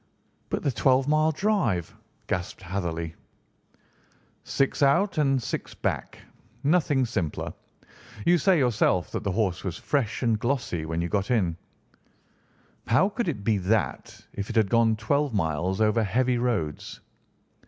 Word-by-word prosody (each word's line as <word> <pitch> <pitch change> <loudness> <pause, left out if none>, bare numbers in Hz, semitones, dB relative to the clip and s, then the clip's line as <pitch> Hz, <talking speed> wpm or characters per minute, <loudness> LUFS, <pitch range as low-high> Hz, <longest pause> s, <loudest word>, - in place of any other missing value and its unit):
"But - - -2
the 140 - +1
twelve 130 +2 +2
mile 155 +1 +3
drive?" 170 - 0 0.3
gasped 90 +1 -4
Hatherley. 85 -3 -3 1.3
"Six 135 +1 0
out 155 +7 +3
and 135 -3 +3
six 120 - -5
back. - - -3 0.5
Nothing 145 -3 +2
simpler. 95 -10 -3 0.7
You 175 0 +5
say 190 +2 +4
yourself 110 - +2
that - - -3
the 100 - -1
horse 95 -4 0
was 90 -3 -4
fresh 135 -5 -1
and 115 -3 +2
glossy 120 - -1
when 80 +1 -2
you - - -1
got 100 +2 -1
in. 95 -9 +1 1.3
How 190 +4 +4
could 235 0 -3
it 130 -12 -3
be 105 -1 +2
that 95 -6 -1
if 100 0 -5
it 115 - -5
had 110 -4 +3
gone 115 -1 +4
twelve 135 +4 0
miles 90 +2 0
over 110 +1 +3
heavy 120 +4 +1
roads?" 105 -12 -2
110 Hz, 145 wpm, -26 LUFS, 95-140 Hz, 1.3 s, You